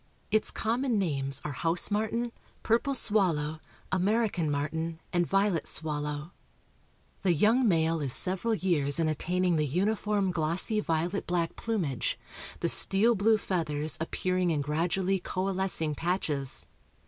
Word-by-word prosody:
Its 215 - +2
common 235 +1 0
names 140 -7 -1
are 150 - -2
house 165 +7 0
martin, 220 +3 0 0.3
purple 235 +5 +2
swallow, 165 - +1 0.3
American 190 -3 +1
martin, 160 +3 -2
and 175 -1 +2
violet 195 -3 +2
swallow. 150 0 -2 0.9
The 185 -3 +3
young 225 - +4
male 165 -3 +2
is 140 -3 -1
several 195 - 0
years 155 -8 +1
in 165 - +2
attaining 175 +3 +1
the 155 - +2
uniform 200 +4 +1
glossy 175 +6 0
violet 175 +1 -1
black 170 -2 0
plumage, 175 - -1 0.4
the - - +2
steel 215 +5 +3
blue 220 +1 +3
feathers 155 -8 -1
appearing 185 +2 0
in 155 -3 +1
gradually 175 +6 0
coalescing 185 -4 -1
patches. 150 -5 -2
180 Hz, 125 wpm, -29 LUFS, 155-205 Hz, 0.9 s, young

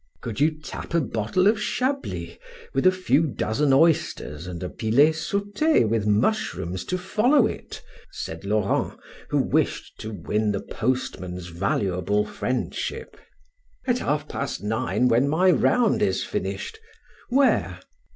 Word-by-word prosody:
"Could 115 0 -5
you 155 +1 +2
tap 155 +2 -6
a - - +5
bottle 120 - 0
of 215 +1 +3
Chablis, 265 +6 -2 0.3
with - - +3
a - - +7
few 165 -4 +2
dozen 140 +2 0
oysters, 135 - +2
and 90 -1 -6
a 90 - -3
filet 125 +8 +4
saute 205 - +1
with 110 -1 0
mushrooms 105 - 0
to 185 - -1
follow 215 +8 +3
it?" - - -6 0.3
said 80 0 -6
Laurent, 100 0 0 0.4
who - - +1
wished - - 0
to 110 - -6
win 105 +2 -1
the 100 - -1
postman's 90 -8 -3
valuable 95 +2 0
friendship. 125 +4 -3 0.7
"At 245 -2 +1
half 150 0 -1
past 140 -7 -4
nine, 105 +1 +1
when 125 +4 +3
my 180 +5 +4
round 245 +5 +3
is - - +1
finished 450 -1 -4 0.5
Where?" 220 - +2
130 Hz, 135 wpm, -24 LUFS, -, 0.7 s, a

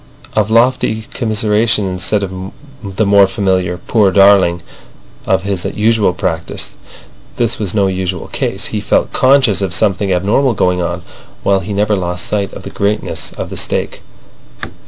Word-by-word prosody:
of 110 -1 +1
lofty 115 -1 +2
commiseration 110 -2 +1
instead 95 +2 -1
of 95 0 -6 0.3
the 100 +2 -1
more 100 -1 +5
familiar 95 -2 0
"Poor 105 +2 +2
darling!" 95 -3 +4 0.6
of 95 0 +1
his 95 -3 -2
usual 110 -2 +1
practice. 80 -2 -4 0.6
This 120 -2 -1
was 105 -2 -2
no 100 -2 +3
usual 95 -1 -2
case. - - -3
He - - -1
felt - - 0
conscious 130 -6 +3
of 95 -3 -1
something 100 -2 +1
abnormal 105 +8 +2
going 90 -2 +1
on, 85 +1 -3 0.4
while 100 -1 +3
he 95 +2 -7
never 105 +1 +1
lost 90 -2 -3
sight 100 -2 -1
of - - -9
the - - -8
greatness 100 +1 -2
of - - -6
the - - -5
stake. - - -2
100 Hz, 155 wpm, -15 LUFS, 95-105 Hz, 0.6 s, more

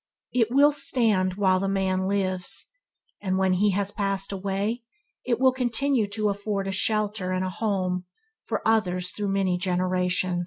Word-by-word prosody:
It 230 -3 +2
will 285 +4 +5
stand 225 -10 +1
while 190 -2 +3
the 195 - -1
man 190 -1 0
lives, 185 -2 0 0.5
and 190 -2 -1
when 190 -1 +2
has 200 +1 +1
passed 195 -2 -1
away 200 +4 -2 0.4
it 240 -2 0
will 260 0 +5
continue 255 -1 0
to 210 0 0
afford 200 -1 -2
a - - -1
shelter 210 -1 0
and 185 0 0
a 185 - -3
home 185 -3 -1 0.4
for - - -3
others 185 -5 +1
through 205 -1 -3
many 190 -2 +1
generation. 180 0 0
195 Hz, 155 wpm, -25 LUFS, 185-215 Hz, 0.5 s, will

